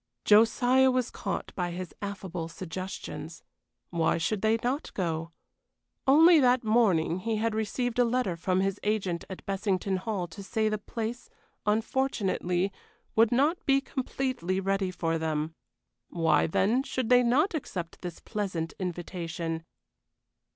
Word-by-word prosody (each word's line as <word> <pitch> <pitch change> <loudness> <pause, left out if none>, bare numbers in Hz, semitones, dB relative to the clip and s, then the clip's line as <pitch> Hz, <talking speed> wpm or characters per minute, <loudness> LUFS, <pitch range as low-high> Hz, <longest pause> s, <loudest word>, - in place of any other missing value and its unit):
Josiah 245 +5 +5
was 255 -2 0
caught - - -4
by 180 -1 -2
his 180 +1 -6
affable 190 -4 -4
suggestions. 165 -2 -7 0.5
Why 165 -2 +2
should 190 +5 -1
they 220 +1 +3
not 260 +5 -1
go? 165 -3 -2 0.8
Only 320 +4 +7
that 250 -2 +4
morning 200 -7 +3
he 225 +4 -1
had 225 +1 0
received 230 +3 -1
a - - +7
letter 235 -6 0
from 185 +2 0
his 195 +1 -1
agent 195 -5 -1
at 190 - -8
Bessington 195 -1 0
Hall 190 -1 -2
to 165 - -9
say 215 +2 0
the 215 -1 -1
place, 230 - -5 0.4
unfortunately, 210 -5 0 0.4
would 225 0 +5
not 290 +8 +2
be 275 0 +5
completely 255 -8 -2
ready 195 0 0
for 165 -2 -1
them. 155 0 -1 0.6
Why, 165 -1 +2
then, 210 +10 +2
should 255 -3 -3
they 250 0 +7
not 260 +11 +3
accept 180 - -5
this 175 -2 -6
pleasant 185 -7 -3
invitation? 170 -2 -4
200 Hz, 135 wpm, -28 LUFS, 175-240 Hz, 0.8 s, Only